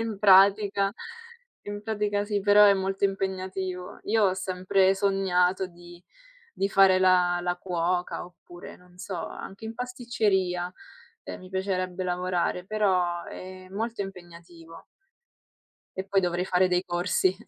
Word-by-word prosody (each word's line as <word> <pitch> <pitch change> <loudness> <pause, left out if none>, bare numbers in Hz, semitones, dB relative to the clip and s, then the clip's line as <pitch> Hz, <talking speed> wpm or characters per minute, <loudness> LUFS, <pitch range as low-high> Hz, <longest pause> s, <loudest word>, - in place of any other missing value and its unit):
In 225 -3 -4
pratica 200 0 +5 0.7
in 205 0 -7
pratica 210 -1 -1
sì, 205 -1 -1
però 205 +1 +6
è 200 - +7
molto 195 +1 -2
impegnativo. 190 -1 -3
Io 220 +1 +2
ho 185 -2 +2
sempre 190 0 +1
sognato 190 -1 +1
di 175 0 -15 0.5
di 195 - 0
fare 195 -1 +5
la 180 -1 +3
la 175 0 -1
cuoca, 180 0 -2
oppure 175 0 -13
non 180 0 -22
so, 180 -3 -5
anche 195 +3 -9
in 220 +1 -6
pasticceria, 210 -8 -1 0.5
ehm, - - -8
mi 185 - -12
piacerebbe 185 -1 -2
lavorare, 180 0 -1
però 185 -5 0
è 185 0 -10
molto 220 +3 -3
impegnativo. 170 -3 -12 1.1
E 190 - -3
poi 195 0 +1
dovrei 180 0 -1
fare 185 0 +2
dei 180 0 +1
corsi. 180 +1 0
185 Hz, 135 wpm, -26 LUFS, 180-200 Hz, 1.1 s, è